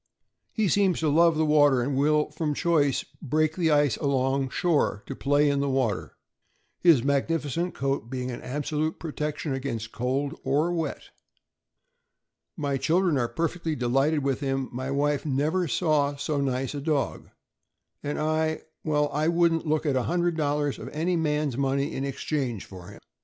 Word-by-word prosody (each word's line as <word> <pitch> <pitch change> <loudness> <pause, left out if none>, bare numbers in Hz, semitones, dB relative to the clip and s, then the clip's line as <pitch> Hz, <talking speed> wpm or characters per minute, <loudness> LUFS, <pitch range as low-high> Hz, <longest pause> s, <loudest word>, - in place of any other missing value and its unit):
" - - -56
He 220 -3 0
seems 190 -1 +2
to 155 - +2
love 165 +2 +4
the 160 - +2
water, 145 -4 +4
and 135 +2 -1
will, 150 +2 +2
from 150 -1 -2
choice, 150 -6 +1 0.2
break 155 +2 +1
the 170 -3 +1
ice 145 -5 +3
along 135 -1 0
shore 150 - 0
to 135 - -6
play 145 +2 +2
in 140 -1 +1
the 140 0 0
water, 130 -6 -1 0.6
his 160 -9 +5
magnificent 150 +4 0
coat 135 -4 -2
being 130 -1 -3
an 120 - -7
absolute 150 +3 -2
protection 150 -2 -3
against 120 -5 -4
cold 135 +4 -1
or 145 +6 +1
wet. 165 -2 -4 1.5
"My 140 -3 -1
children 170 +3 +2
are 120 - +1
perfectly 165 -1 -2
delighted 135 +4 +1
with 135 -2 0
him; 135 -2 -2
my 130 +2 -4
wife 145 +1 0
'never 155 +5 0
saw 145 +3 +1
so 145 0 -2
nice 130 -1 -1
a 145 - -4
dog,' 150 -2 -1 0.7
and 145 0 -3
I— 155 0 0 0.2
well, 150 -1 +1
I 150 +2 +1
wouldn't 170 -1 +2
look 155 +1 +1
at 145 -3 +1
$100 150 0 0
of - - -7
any 170 +4 -1
man' 150 -2 0
s 125 - -6
money 140 0 0
in 135 - -2
exchange 135 -5 -3
for 90 -2 -11
him. 105 - -12
145 Hz, 165 wpm, -26 LUFS, 135-155 Hz, 1.5 s, his